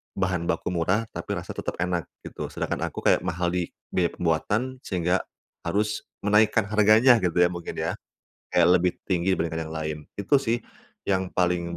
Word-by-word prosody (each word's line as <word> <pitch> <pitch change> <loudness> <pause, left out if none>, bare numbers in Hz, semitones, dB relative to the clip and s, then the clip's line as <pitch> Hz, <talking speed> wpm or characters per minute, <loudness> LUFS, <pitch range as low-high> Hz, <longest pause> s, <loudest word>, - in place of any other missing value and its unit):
bahan 90 -3 -1
baku 85 - -1
murah, 90 +5 +1
tapi 100 - -4
rasa 85 -2 -5
tetap - - -4
enak, 90 -2 -1 0.2
gitu. - - -6
Sedangkan - - -3
aku - - -7
kayak - - +5
mahal 85 0 0
di 90 -1 -1 0.2
biaya 90 -2 +2
pembuatan 105 +10 0
sehingga 90 -4 0 0.5
harus 105 +4 -1 0.2
menaikkan 105 +2 +4
harganya 110 +4 +5
gitu 90 -2 +2
ya, 90 - +3
mungkin 85 -1 -6
ya. - - -1 0.6
Kayak 90 0 +4
lebih 90 0 +2
tinggi 95 0 +1
dibandingkan 80 -1 -2
yang 80 - -7
lain. 80 -1 -3 0.2
Itu 100 +8 +3
sih, 120 -2 -1 0.4
yang 95 -1 0
paling 90 -1 0
90 Hz, 170 wpm, -26 LUFS, 85-105 Hz, 0.6 s, kayak